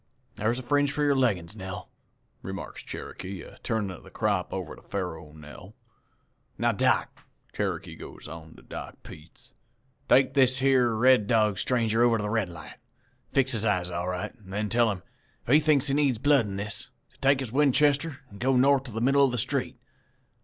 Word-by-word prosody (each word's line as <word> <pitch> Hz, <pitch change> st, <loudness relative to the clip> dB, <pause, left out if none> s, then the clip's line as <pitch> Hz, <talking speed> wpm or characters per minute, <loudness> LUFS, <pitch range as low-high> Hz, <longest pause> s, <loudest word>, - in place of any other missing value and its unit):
"'Thar's 115 Hz, +3 st, 0 dB
a 130 Hz, -, -5 dB
fringe 145 Hz, +2 st, +2 dB
for 150 Hz, +1 st, -1 dB
your 145 Hz, -1 st, +3 dB
leggin's, 105 Hz, -9 st, 0 dB
Nell,' 95 Hz, -1 st, -7 dB, 0.5 s
remarks -, -, -7 dB
Cherokee, 95 Hz, -1 st, -7 dB
a -, -, -14 dB
turnin' 105 Hz, -4 st, -1 dB
of 90 Hz, -, -10 dB
the -, -, -14 dB
crop -, -, -1 dB
over -, -, -5 dB
to -, -, -16 dB
Faro 80 Hz, -6 st, -5 dB
Nell. 80 Hz, +7 st, -13 dB, 0.8 s
'Now, -, -, +2 dB
Doc,' -, -, 0 dB, 0.3 s
Cherokee -, -, -3 dB
goes -, -, -11 dB
on 80 Hz, 0 st, -10 dB
to -, -, -16 dB
Doc -, -, -8 dB
Peets, 80 Hz, +2 st, -14 dB, 0.6 s
'take 135 Hz, 0 st, +5 dB
this 130 Hz, -1 st, +3 dB
yere 130 Hz, -3 st, +3 dB
Red 125 Hz, -2 st, +4 dB
Dog 110 Hz, -4 st, +2 dB
stranger 115 Hz, -2 st, +1 dB
over 120 Hz, -1 st, +4 dB
to 105 Hz, -, -3 dB
the 105 Hz, -, -2 dB
Red 110 Hz, -5 st, 0 dB
Light, 85 Hz, -, -11 dB, 0.5 s
fix 135 Hz, -1 st, +2 dB
his 110 Hz, -3 st, +1 dB
eyes 90 Hz, -5 st, +1 dB
all 85 Hz, +1 st, -3 dB
right, 90 Hz, -1 st, -4 dB
an' 95 Hz, -, -15 dB
then 105 Hz, +2 st, -2 dB
tell 120 Hz, 0 st, +3 dB
him, 95 Hz, -4 st, -4 dB, 0.4 s
if 125 Hz, -, +2 dB
he 150 Hz, -, +8 dB
thinks 150 Hz, -3 st, +3 dB
he 135 Hz, -, +1 dB
needs 140 Hz, -4 st, +2 dB
blood 140 Hz, -2 st, +3 dB
in 100 Hz, -, -5 dB
this, 100 Hz, +1 st, -5 dB, 0.2 s
to -, -, -27 dB
take 135 Hz, 0 st, +3 dB
his 130 Hz, -5 st, -4 dB
Winchester 145 Hz, +2 st, +2 dB
an' 100 Hz, -, -12 dB
go 130 Hz, +2 st, +2 dB
north 135 Hz, +1 st, +4 dB
in 115 Hz, -, -9 dB
the 115 Hz, -, -2 dB
middle 135 Hz, +3 st, +4 dB
of 135 Hz, -, +3 dB
the 125 Hz, -, -2 dB
street. 105 Hz, -, -1 dB
115 Hz, 195 wpm, -27 LUFS, 100-135 Hz, 0.8 s, he